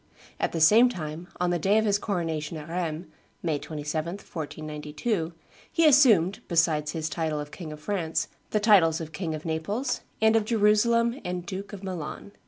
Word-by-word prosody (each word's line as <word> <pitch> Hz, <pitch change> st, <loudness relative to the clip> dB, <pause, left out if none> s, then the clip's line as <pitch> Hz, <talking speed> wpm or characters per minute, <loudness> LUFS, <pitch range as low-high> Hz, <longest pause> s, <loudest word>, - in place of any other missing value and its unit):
At -, -, 0 dB
the 165 Hz, -, -2 dB
same 220 Hz, +10 st, +7 dB
time, 165 Hz, -4 st, -6 dB
on 180 Hz, 0 st, +1 dB
the 175 Hz, -, 0 dB
day 195 Hz, +6 st, +3 dB
of 220 Hz, -, +2 dB
his 205 Hz, -1 st, +2 dB
coronation 165 Hz, -6 st, -2 dB
at 155 Hz, +1 st, -9 dB
Rheims 170 Hz, -1 st, -3 dB, 0.4 s
[May 155 Hz, -4 st, 0 dB
27, 155 Hz, +2 st, -4 dB
1492], 155 Hz, -, -4 dB, 0.4 s
he 330 Hz, -, +3 dB
assumed, 230 Hz, -, +5 dB
besides 160 Hz, -3 st, +2 dB
his 160 Hz, -1 st, -2 dB
title 155 Hz, 0 st, -2 dB
of 145 Hz, 0 st, -6 dB
King 165 Hz, -2 st, -8 dB
of 150 Hz, 0 st, -9 dB
France, 165 Hz, -2 st, -1 dB, 0.2 s
the 215 Hz, -, +1 dB
titles 190 Hz, -7 st, +5 dB
of 160 Hz, -1 st, -6 dB
King 160 Hz, -1 st, -3 dB
of 155 Hz, -, -8 dB
Naples 205 Hz, +11 st, -2 dB, 0.2 s
and 220 Hz, 0 st, +4 dB
of 225 Hz, -, +4 dB
Jerusalem 230 Hz, +3 st, +3 dB
and 180 Hz, -1 st, -4 dB
Duke 195 Hz, +2 st, -6 dB
of 200 Hz, -2 st, -9 dB
Milan. 185 Hz, +1 st, -6 dB
170 Hz, 180 wpm, -27 LUFS, 155-205 Hz, 0.4 s, same